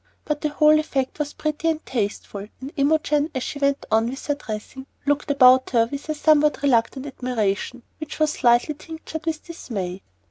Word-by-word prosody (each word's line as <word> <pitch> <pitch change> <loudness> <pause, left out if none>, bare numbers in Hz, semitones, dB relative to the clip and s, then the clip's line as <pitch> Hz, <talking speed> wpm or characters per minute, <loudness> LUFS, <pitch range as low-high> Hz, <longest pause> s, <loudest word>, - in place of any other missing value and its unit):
But 300 -1 -2
the 300 - 0
whole 305 +1 +5
effect 275 -2 -2
was 295 -1 -2
pretty 305 +1 -1
and 320 0 -2
tasteful, 205 -3 -3
and 270 +3 -8
Imogen, 295 +1 +2
as 260 - -1
she 285 - -5
went 280 0 +1
on 225 +1 +3
with 265 +2 -7
her 290 - +1
dressing, 265 0 -7 0.2
looked 290 +1 0
about 260 -2 +6
her 230 -2 +3
with 285 +2 -6
a 310 - 0
somewhat 300 0 +3
reluctant 265 0 +2
admiration, 245 -3 -2 0.2
which 310 -1 -6
was 310 -1 +2
slightly 245 +2 +3
tinctured 320 +2 -8
with 315 -1 -2
dismay. 195 - -5
285 Hz, 180 wpm, -23 LUFS, 245-305 Hz, 0.2 s, about